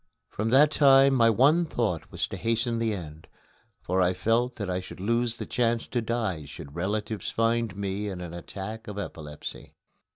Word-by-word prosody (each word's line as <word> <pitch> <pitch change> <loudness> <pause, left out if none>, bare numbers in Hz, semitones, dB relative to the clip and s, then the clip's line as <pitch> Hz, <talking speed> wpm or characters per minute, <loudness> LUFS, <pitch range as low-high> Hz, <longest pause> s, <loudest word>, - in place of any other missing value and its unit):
From 110 +2 -2
that 145 +5 +6
time 135 -2 +6
my 115 -3 +5
one 140 +10 +4
thought 110 - -2
was - - -1
to - - -5
hasten 115 +1 0
the 115 -1 +1
end, 80 -6 -7 0.6
for 95 +1 +1
I 90 0 +2
felt 115 +6 +1
that 105 - -4
I 90 0 -1
should 95 - -10
lose 115 +3 0
the - - -5
chance 115 -1 0
to 120 - 0
die 110 -9 -2
should 70 0 -10
relatives 105 +5 -2
find 115 -2 0
me 100 +1 -3
in 95 -2 -6
an 90 -2 -7
attack 100 +5 -7
of 105 -1 -6
epilepsy. 75 -6 -7
110 Hz, 185 wpm, -27 LUFS, 90-120 Hz, 0.6 s, that